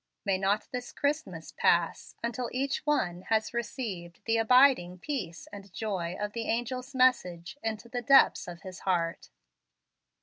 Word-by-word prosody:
May 195 -2 +1
not 200 +2 +1
this 250 0 -5
Christmas 285 - -2
pass 170 -1 +1
until 235 +1 -2
each 270 +2 -1
one 180 -12 +1
has 220 0 +1
received 215 -7 -5
the 230 0 +2
abiding 225 -6 +5
peace 185 - -5
and 200 -1 -10
joy 185 -5 -3
of 210 0 -3
the 230 -1 -3
angel's 250 +3 -2
message 240 -7 +2
into 225 +1 -4
the 245 +1 -4
depths 270 +3 +5
of 175 -1 -9
his 185 -2 -8
heart." 170 -3 -1
220 Hz, 145 wpm, -29 LUFS, 180-250 Hz, -, abiding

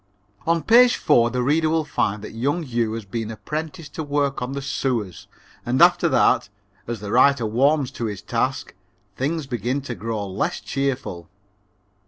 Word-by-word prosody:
On 165 -1 +2
page 245 +2 +6
four 120 0 +3
the 125 +1 -1
reader 155 +4 +2
will 160 -1 +1
find 105 -8 -1
that - - -7
young 140 +9 -1
Hugh 120 -5 -1
has 115 -2 -5
been 110 +2 -4
apprenticed 155 - -6
to 160 - -4
work 145 -2 -1
on 125 +2 -3
the 140 - -3
sewers 120 -9 -2 0.4
and - - 0
after - - +5
that, - - +3 0.4
as 115 -3 -4
the 100 -1 -5
writer 130 0 +4
warms 135 +5 +2
to 120 - -4
his 105 -3 -5
task, 130 +3 -2 0.4
things 150 +5 -2
begin 125 +1 -2
to 130 -3 -5
grow 110 -2 -4
less 95 +1 -2
cheerful. 130 - -3
130 Hz, 170 wpm, -22 LUFS, 115-145 Hz, 0.4 s, page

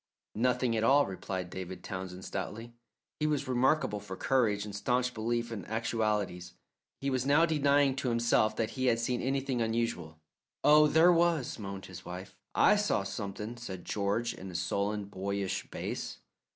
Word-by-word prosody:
"Nothing 125 +1 +1
at 110 - 0
all," 140 +4 +5
replied 95 -1 -5
David 95 0 -6
Townsend 95 -1 -6
stoutly. 115 +5 -5 0.5
He 155 - +1
was 145 -2 0
remarkable 130 -3 +2
for 100 -2 -7
courage 110 -3 +1
and 105 -1 -7
staunch 125 +4 0
belief 115 +1 -1
in 105 -5 -5
actualities. 105 -6 -1 0.5
He 135 0 -1
was 130 -1 0
now 145 +5 +5
denying 145 -3 +3
to 130 - -1
himself 115 -2 +2
that 110 0 -1
he 130 -1 -1
had 115 -2 +4
seen 120 +1 -1
anything 135 -1 -1
unusual. 110 -9 -2 0.4
"Oh, 150 0 +7
there 160 +4 +6
was," 165 -8 +1
moaned 100 -1 -6
his 90 -1 -10
wife. 90 +3 -8 0.2
"I 210 - +5
saw 205 - +1
something," 105 +3 -5
said 95 -7 -7
George, 105 +4 -1
in 95 - -9
a 90 - -9
sullen, 100 +3 -1
boyish 100 0 -3
bass. - - -4
115 Hz, 165 wpm, -31 LUFS, 100-130 Hz, 0.5 s, Oh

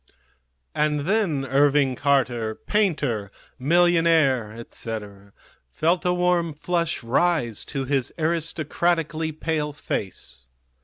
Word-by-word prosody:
And 150 -1 +1
then 170 -5 0
Irving 140 0 +3
Carter, 125 -5 +1
painter, 145 - -1 0.3
millionaire, 165 -6 +3
etc., 105 -3 -7 0.4
felt 170 - 0
a 180 - +3
warm 175 -3 +1
flush 170 -2 -1
rise 125 -2 +1
to 135 -2 -4
his 135 -1 0
aristocratically 165 0 0
pale 155 -1 -2
face. 65 - -6
150 Hz, 95 wpm, -24 LUFS, 120-170 Hz, 0.4 s, Irving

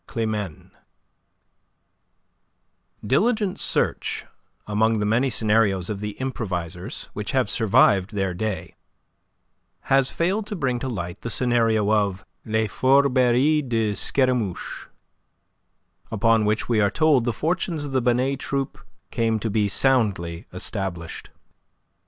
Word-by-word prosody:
CLIMENE 105 -7 -4 2.3
Diligent 205 - +1
search - - -1 0.4
among 110 +2 +1
the 105 - -1
many 120 +6 +2
scenarios 105 -5 +1
of 100 - -4
the 105 0 -4
improvisers 90 -10 -4
which 105 -1 -4
have 130 -2 +2
survived 100 -2 +3
their 95 -2 -1
day, 105 +2 -4 1.2
has 135 -1 +4
failed 195 +5 -1
to 215 - -4
bring 130 -7 -1
to 130 - -3
light 90 -5 -5
the 115 - -4
scenario 115 -4 +1
of 100 -3 0 0.2
"Les 110 0 +1
Fourberies 130 +4 +3
de 110 -3 +1
Scaramouche," 125 -5 -1 1.2
upon 115 0 +2
which 105 +1 0
we 115 -3 +2
are 100 - +3
told 150 -1 +3
the 120 - 0
fortunes 165 - -1
of 145 - -5
the 130 -1 +1
Binet 125 +3 +1
troupe 135 0 -3 0.3
came 115 -1 +1
to 110 0 -3
be 105 0 +1
soundly 100 -9 +1
established. 90 -3 -4
115 Hz, 120 wpm, -23 LUFS, 105-130 Hz, 2.3 s, has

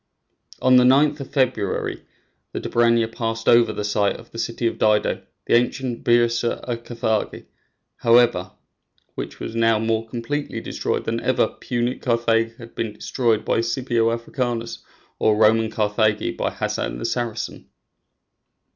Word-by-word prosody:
On 130 0 +6
the 125 - +6
9th 145 +4 +4
of 140 - -7
February 130 -8 -1 0.5
the - - -3
Dobryna 115 -1 +2
passed 115 -1 -3
over 120 0 +5
the 105 - -4
site 105 0 +1
of 115 - -13
the 115 - -8
city 115 +1 -3
of 115 - -1
Dido, 105 -1 +2 0.2
the - - 0
ancient 120 0 +1
Byrsa 120 0 +2
a 120 - -1
Carthage, 115 -2 -3 0.5
however, 115 -6 +3 0.6
which - - -7
was 110 - -6
now 115 -1 +3
more 110 +1 -1
completely 125 +6 -4
destroyed - - -3
than - - -1
ever - - +2
Punic 120 +1 -3
Carthage 115 -1 +1
had 115 0 -12
been 110 -2 -3
destroyed 115 0 0
by - - +1
Scipio 115 -1 0
Africanus 115 -1 -3 0.4
or 110 -1 +3
Roman 110 +1 +4
Carthage 105 0 0
by - - -1
Hassan - - -3
the - - -5
Saracen. 120 -3 -3
115 Hz, 145 wpm, -22 LUFS, 110-120 Hz, 0.6 s, On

